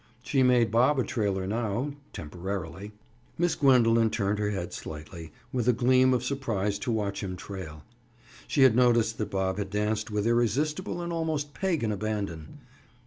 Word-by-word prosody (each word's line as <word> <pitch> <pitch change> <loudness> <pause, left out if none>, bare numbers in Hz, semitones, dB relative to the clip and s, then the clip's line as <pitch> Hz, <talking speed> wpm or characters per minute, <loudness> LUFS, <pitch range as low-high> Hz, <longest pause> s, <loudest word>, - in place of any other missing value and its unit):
She 135 +1 +1
made 125 -2 +4
Bob 125 +6 +4
a 130 - +2
trailer 100 -6 -1
now, 115 +6 -1 0.2
temporarily. 90 +3 -6 0.5
Miss 175 -1 +2
Gwendoline 115 -5 +4
turned 100 0 -1
her 105 -1 0
head 95 -4 -4
slightly, 80 +2 -8 0.2
with 125 -2 -1
a 125 - +5
gleam 130 +2 +4
of 125 -1 +1
surprise 115 -7 -1
to 120 - -2
watch 100 -3 -2
him 95 -2 -4
trail. 90 -6 -8 0.6
She 140 - +3
had 130 -4 +6
noticed 120 -2 +3
that 105 -2 -2
Bob 95 0 -1
had 100 -1 -3
danced 105 +2 -1
with 105 -1 -1
irresistible 145 - 0
and 170 0 -4
almost 155 -3 -2
pagan 165 - -1
abandon. 100 -7 -4
110 Hz, 160 wpm, -28 LUFS, 100-125 Hz, 0.6 s, had